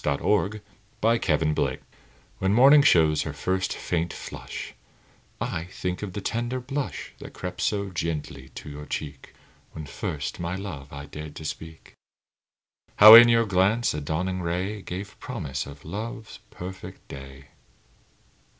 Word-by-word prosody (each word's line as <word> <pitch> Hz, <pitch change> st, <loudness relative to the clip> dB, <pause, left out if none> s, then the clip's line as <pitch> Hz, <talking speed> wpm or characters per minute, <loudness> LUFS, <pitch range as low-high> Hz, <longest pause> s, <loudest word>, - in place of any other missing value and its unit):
MORNING, 100 Hz, +8 st, +1 dB, 0.4 s
NOON 115 Hz, +1 st, +3 dB, 0.2 s
AND 75 Hz, -1 st, +1 dB
NIGHT -, -, -1 dB, 0.6 s
When 95 Hz, +2 st, +2 dB
morning 140 Hz, +5 st, +8 dB
shows 80 Hz, -, +4 dB
her -, -, -4 dB
first 95 Hz, 0 st, -1 dB
faint 85 Hz, 0 st, -2 dB
flush, -, -, -7 dB, 0.7 s
I 80 Hz, -, -3 dB
think 90 Hz, 0 st, -4 dB
of 100 Hz, -3 st, -5 dB
the 100 Hz, -, -4 dB
tender 120 Hz, +5 st, -2 dB
blush 135 Hz, +2 st, -4 dB
That -, -, -10 dB
crept 90 Hz, -1 st, -5 dB
so 100 Hz, -2 st, 0 dB
gently 75 Hz, -6 st, -4 dB
to -, -, -8 dB
your 75 Hz, 0 st, -8 dB
cheek 70 Hz, -2 st, -6 dB, 0.4 s
When 80 Hz, -, -7 dB
first 70 Hz, -1 st, -4 dB
my 85 Hz, +1 st, -3 dB
love 85 Hz, -9 st, -7 dB
I 70 Hz, 0 st, -7 dB
dared 75 Hz, 0 st, -9 dB
to 80 Hz, -, -8 dB
speak; 80 Hz, +1 st, -8 dB, 1.0 s
How, 110 Hz, +1 st, +11 dB
in 120 Hz, +1 st, +11 dB
your 115 Hz, 0 st, +4 dB
glance, 100 Hz, +4 st, +2 dB
a 75 Hz, -, -3 dB
dawning 90 Hz, +5 st, -2 dB
ray 90 Hz, +5 st, -2 dB
Gave 95 Hz, +3 st, -7 dB
promise 75 Hz, -, -4 dB
of 70 Hz, 0 st, -12 dB
love's 110 Hz, +6 st, -6 dB
perfect 95 Hz, +2 st, -9 dB
day. 70 Hz, +1 st, -11 dB
90 Hz, 145 wpm, -26 LUFS, 75-105 Hz, 1.0 s, How